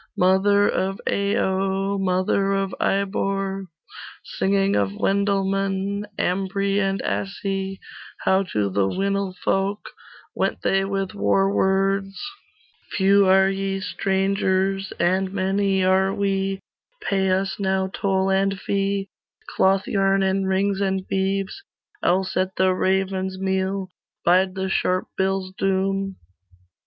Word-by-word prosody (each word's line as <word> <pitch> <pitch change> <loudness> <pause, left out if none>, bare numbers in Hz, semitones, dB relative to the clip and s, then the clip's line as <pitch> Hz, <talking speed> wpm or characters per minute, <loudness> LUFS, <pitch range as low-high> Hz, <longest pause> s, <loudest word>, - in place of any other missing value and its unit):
Mother 200 +2 +4
of 195 +1 -1
Ayo 195 0 0
Mother 190 +1 +1
of 195 -1 -1
Ibor. 195 0 -1 0.6
Singing 200 - 0
of 100 -1 0
Wendel 200 - +1
men, 195 +1 -1
Ambri 195 +2 0
and 195 -1 0
Assi; 195 0 -3 0.4
How 190 0 +3
to 100 -2 0
the 95 0 +1
Winilfolk 195 - -1 0.4
Went - - -2
they 195 0 +2
with 195 0 -2
war 195 -1 +2
words 195 0 +1 0.7
'Few 200 0 +4
are 190 0 +5
ye, 195 0 -2
strangers, 195 0 0
And 185 +2 +1
many 195 0 +1
are 190 +1 +3
we; 195 -1 -1 0.5
Pay 195 -1 +1
us 190 +1 0
now 190 -1 +1
toll 190 -1 0
and 195 0 +1
fee, 195 0 -1 0.5
Clothyarn, 195 0 +2
and 190 0 +1
rings, 195 +1 +1
and 190 -1 -1
beeves; 195 - -1 0.4
Else 185 +1 +1
at 185 0 0
the 185 0 +3
raven's 190 0 0
meal 190 0 -1 0.4
Bide 185 +2 +3
the 190 0 -2
sharp 185 -1 0
bill's 190 -1 -1
doom. 195 0 0
195 Hz, 115 wpm, -23 LUFS, 190-195 Hz, 0.7 s, are